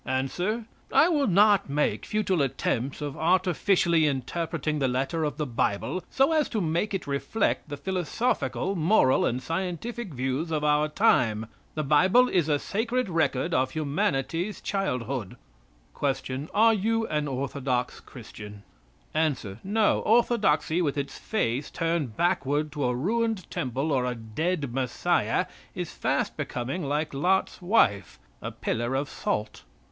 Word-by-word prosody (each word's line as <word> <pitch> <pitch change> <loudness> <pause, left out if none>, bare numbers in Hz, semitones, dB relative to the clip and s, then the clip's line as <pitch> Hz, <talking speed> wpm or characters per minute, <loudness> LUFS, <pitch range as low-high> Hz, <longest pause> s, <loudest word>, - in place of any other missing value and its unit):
Answer. 175 - -1 0.3
"I 330 - +5
will 290 -5 +2
not 200 -1 +4
make 150 +1 0
futile 200 -6 +1
attempts 135 0 -1
of 145 -2 -4
artificially 175 -1 +2
interpreting 150 +2 -2
the 135 - +2
letter 135 +6 -1
of 150 - -2
the 150 - -1
Bible 120 - -1
so 270 +3 +3
as 310 -2 +2
to 220 - -1
make 175 +4 0
it 190 - -4
reflect 145 +5 -1
the 145 - -5
philosophical, 190 - -1
moral 160 -6 +3
and 125 +2 -2
scientific 185 - -4
views 130 +6 -1
of 155 -2 -1
our 150 0 +3
time. 115 -7 +2 0.3
The 155 - -1
Bible 185 - +5
is 170 -4 +1
a 145 - +3
sacred 230 - -1
record 145 -6 +1
of 130 0 +2
humanity's 155 +5 -1
childhood." 125 - -2 0.8
Q. 135 +4 -6
Are 225 +2 +5
you 225 +2 +1
an 150 -6 -1
orthodox 130 -2 -2
Christian? 105 -4 -11 0.5
A. 155 -2 +2 0.3
"No. 210 +2 +2
Orthodoxy, 205 -8 +2
with 150 -3 -1
its 140 -1 -4
face 135 - -1
turned 165 -9 -2
backward 150 -3 +1
to 145 -2 -2
a 125 0 +1
ruined 220 - -1
temple 135 +5 -2
or 130 -3 +1
a 125 0 -2
dead 140 +5 -2
Messiah, 125 -2 0 0.3
is - - -4
fast - - -1
becoming 130 +8 -3
like 150 +2 -1
Lot's 185 +8 +1
wife, 105 - +2 0.2
a - - -4
pillar 120 +3 -2
of 140 +2 -1
salt." 105 -5 -3
155 Hz, 140 wpm, -27 LUFS, 130-190 Hz, 0.8 s, I